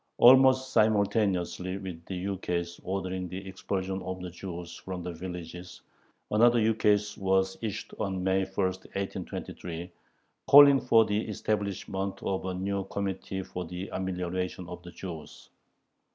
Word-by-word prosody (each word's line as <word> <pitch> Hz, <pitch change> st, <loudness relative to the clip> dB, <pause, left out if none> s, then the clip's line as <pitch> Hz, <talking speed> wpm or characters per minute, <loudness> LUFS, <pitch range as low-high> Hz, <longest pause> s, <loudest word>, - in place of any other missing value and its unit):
Almost 130 Hz, +1 st, +7 dB
simultaneously 100 Hz, -4 st, +2 dB
with 90 Hz, -4 st, -7 dB
the 95 Hz, -, -4 dB
ukase 90 Hz, -2 st, -3 dB
ordering 95 Hz, -1 st, -3 dB
the 95 Hz, +2 st, -6 dB
expulsion 95 Hz, 0 st, -3 dB
of 95 Hz, +1 st, -5 dB
the 90 Hz, -1 st, -6 dB
Jews 90 Hz, -1 st, -7 dB
from 90 Hz, -2 st, -6 dB
the 90 Hz, -, -4 dB
villages, 90 Hz, 0 st, -8 dB, 0.5 s
another 120 Hz, +3 st, +5 dB
ukase 105 Hz, -2 st, +2 dB
was 95 Hz, 0 st, +2 dB
issued 110 Hz, -4 st, -4 dB
on 95 Hz, -2 st, -2 dB
May 95 Hz, 0 st, +2 dB
1, -, -, -15 dB, 0.2 s
1823, 95 Hz, -2 st, -5 dB, 0.6 s
calling 140 Hz, 0 st, +9 dB
for 115 Hz, -3 st, +5 dB
the 105 Hz, +1 st, 0 dB
establishment 100 Hz, -2 st, -2 dB
of 95 Hz, -1 st, -1 dB
a 95 Hz, -, -2 dB
new 100 Hz, +1 st, -1 dB
"Committee 95 Hz, -1 st, -3 dB
for 90 Hz, 0 st, -5 dB
the 90 Hz, +3 st, -6 dB
Amelioration 90 Hz, -1 st, -3 dB
of 90 Hz, 0 st, -8 dB
the 90 Hz, -, -10 dB
Jews." 85 Hz, -4 st, -9 dB
95 Hz, 135 wpm, -29 LUFS, 90-100 Hz, 0.6 s, calling